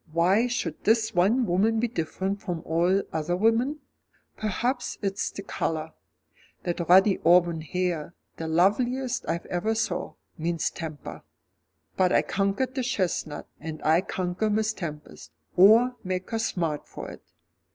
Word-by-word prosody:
"Why 185 Hz, +8 st, +3 dB
should 245 Hz, +1 st, -3 dB
this 220 Hz, 0 st, +2 dB
one 210 Hz, +8 st, +3 dB
woman 215 Hz, +5 st, +2 dB
be 240 Hz, -, +1 dB
different 195 Hz, 0 st, -3 dB
from 170 Hz, -3 st, -4 dB
all 175 Hz, +4 st, +2 dB
other 160 Hz, +2 st, -1 dB
women? 230 Hz, +8 st, +2 dB, 0.5 s
Perhaps 240 Hz, +4 st, -2 dB
it's 195 Hz, 0 st, -1 dB
the 200 Hz, -, -8 dB
colour. 160 Hz, -4 st, -3 dB, 0.7 s
That 175 Hz, 0 st, -2 dB
ruddy 190 Hz, +2 st, +6 dB
auburn 170 Hz, -1 st, +4 dB
hair, 170 Hz, 0 st, -2 dB, 0.2 s
the 160 Hz, -, -4 dB
loveliest 240 Hz, +10 st, +1 dB
I 170 Hz, -, 0 dB
ever 215 Hz, +6 st, 0 dB
saw, 220 Hz, -, -2 dB, 0.2 s
means 165 Hz, 0 st, -1 dB
temper. 155 Hz, -3 st, -7 dB, 0.8 s
But 185 Hz, -1 st, +3 dB
I -, -, +4 dB
conquered 200 Hz, +7 st, -1 dB
the 260 Hz, -, -1 dB
chestnut, 185 Hz, -, -2 dB
and 155 Hz, 0 st, -6 dB
I'll 160 Hz, +3 st, +4 dB
conquer 185 Hz, +2 st, -2 dB
Miss 215 Hz, +1 st, +1 dB
Tempest 150 Hz, -, -8 dB, 0.2 s
or 225 Hz, +7 st, +6 dB
make 185 Hz, 0 st, -3 dB
her 225 Hz, -, -1 dB
smart 170 Hz, -9 st, -2 dB
for -, -, -8 dB
it." -, -, -12 dB
185 Hz, 140 wpm, -26 LUFS, 170-220 Hz, 0.8 s, ruddy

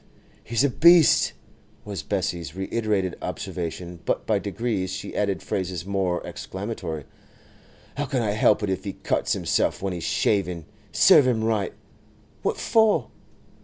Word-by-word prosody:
'He's 115 Hz, +3 st, 0 dB
a 140 Hz, -, +4 dB
beast!' 170 Hz, +2 st, +6 dB, 0.5 s
was 100 Hz, -2 st, -4 dB
Bessie's 85 Hz, -6 st, -3 dB
reiterated 95 Hz, -1 st, -1 dB
observation; 85 Hz, 0 st, -5 dB
but -, -, -1 dB
by -, -, +2 dB
degrees 110 Hz, -6 st, -2 dB
she 95 Hz, -, -6 dB
added 100 Hz, -2 st, -1 dB
phrases 90 Hz, -2 st, -3 dB
more 95 Hz, -3 st, -1 dB
explanatory. 95 Hz, -7 st, -5 dB, 0.9 s
'How 145 Hz, -, 0 dB
can 130 Hz, -3 st, 0 dB
I 105 Hz, -, 0 dB
help 105 Hz, 0 st, +3 dB
it 105 Hz, -, -1 dB
if 95 Hz, 0 st, -3 dB
he 100 Hz, -, -4 dB
cuts -, -, -1 dB
himself -, -, 0 dB
when 95 Hz, -1 st, -1 dB
he's 85 Hz, -2 st, -5 dB
shaving?—Serve 100 Hz, -, +2 dB
him 115 Hz, -3 st, +1 dB
right!—What 110 Hz, -4 st, -4 dB
for? 220 Hz, -2 st, +3 dB
100 Hz, 130 wpm, -24 LUFS, 90-110 Hz, 0.9 s, beast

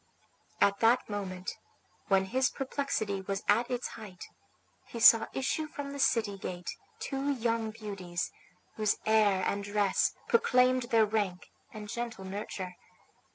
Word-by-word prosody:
At 200 Hz, 0 st, +3 dB
that 235 Hz, +2 st, +4 dB
moment, 190 Hz, -2 st, -4 dB, 0.6 s
when 195 Hz, -1 st, +3 dB
his 260 Hz, +7 st, +1 dB
perplexity 260 Hz, -7 st, -2 dB
was 195 Hz, +1 st, -3 dB
at 240 Hz, +1 st, +3 dB
its 245 Hz, -1 st, -2 dB
height, 205 Hz, -5 st, -10 dB, 0.6 s
he 235 Hz, -, -7 dB
saw 230 Hz, 0 st, +8 dB
issue 285 Hz, +4 st, -1 dB
from 285 Hz, -2 st, -6 dB
the 280 Hz, -, -6 dB
city 220 Hz, -6 st, +1 dB
gate 180 Hz, -2 st, -5 dB, 0.2 s
two 275 Hz, 0 st, -2 dB
young 230 Hz, -3 st, -1 dB
beauties, 200 Hz, -6 st, -5 dB, 0.5 s
whose 215 Hz, -2 st, +1 dB
air 210 Hz, -4 st, +4 dB
and 200 Hz, 0 st, -1 dB
dress 205 Hz, -1 st, +1 dB
proclaimed 255 Hz, -, +3 dB
their 225 Hz, -1 st, +5 dB
rank 205 Hz, -4 st, -2 dB, 0.2 s
and 210 Hz, -1 st, -8 dB
gentle 230 Hz, -3 st, -5 dB
nurture. 190 Hz, -2 st, -5 dB
215 Hz, 135 wpm, -30 LUFS, 195-245 Hz, 0.6 s, saw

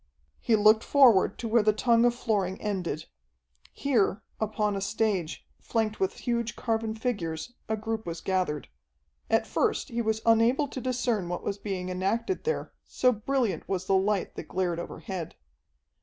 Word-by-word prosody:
He 230 Hz, -, +2 dB
looked 215 Hz, +1 st, +5 dB
forward 250 Hz, -9 st, +5 dB
to 235 Hz, -, -4 dB
where 230 Hz, +1 st, +4 dB
the 215 Hz, 0 st, +3 dB
tongue 230 Hz, +2 st, +3 dB
of 240 Hz, 0 st, +3 dB
flooring 200 Hz, -6 st, -1 dB
ended. 180 Hz, -7 st, -3 dB, 0.7 s
Here, 225 Hz, -6 st, +1 dB, 0.2 s
upon 210 Hz, -1 st, 0 dB
a 195 Hz, -, -3 dB
stage, 200 Hz, -5 st, -1 dB
flanked 220 Hz, -2 st, -1 dB
with 190 Hz, 0 st, -1 dB
huge 235 Hz, -2 st, -1 dB
carven 225 Hz, -1 st, -1 dB
figures, 205 Hz, -5 st, -3 dB, 0.2 s
a 220 Hz, -, 0 dB
group 220 Hz, 0 st, -4 dB
was 170 Hz, 0 st, -4 dB
gathered. 180 Hz, -8 st, -1 dB, 0.6 s
At -, -, +3 dB
first -, -, 0 dB
he 235 Hz, 0 st, -1 dB
was 220 Hz, -1 st, -1 dB
unable 230 Hz, +6 st, +4 dB
to 260 Hz, -, -6 dB
discern 240 Hz, -7 st, -1 dB
what 175 Hz, -, -4 dB
was 200 Hz, 0 st, -3 dB
being 190 Hz, -3 st, -4 dB
enacted 205 Hz, -, -1 dB
there, 470 Hz, -, -2 dB
so 250 Hz, -, +2 dB
brilliant 240 Hz, 0 st, -1 dB
was 185 Hz, -1 st, -1 dB
the 195 Hz, -, +1 dB
light 195 Hz, +1 st, +1 dB
that -, -, -6 dB
glared 180 Hz, -2 st, -1 dB
overhead. 175 Hz, -1 st, -6 dB
215 Hz, 160 wpm, -28 LUFS, 190-235 Hz, 0.7 s, looked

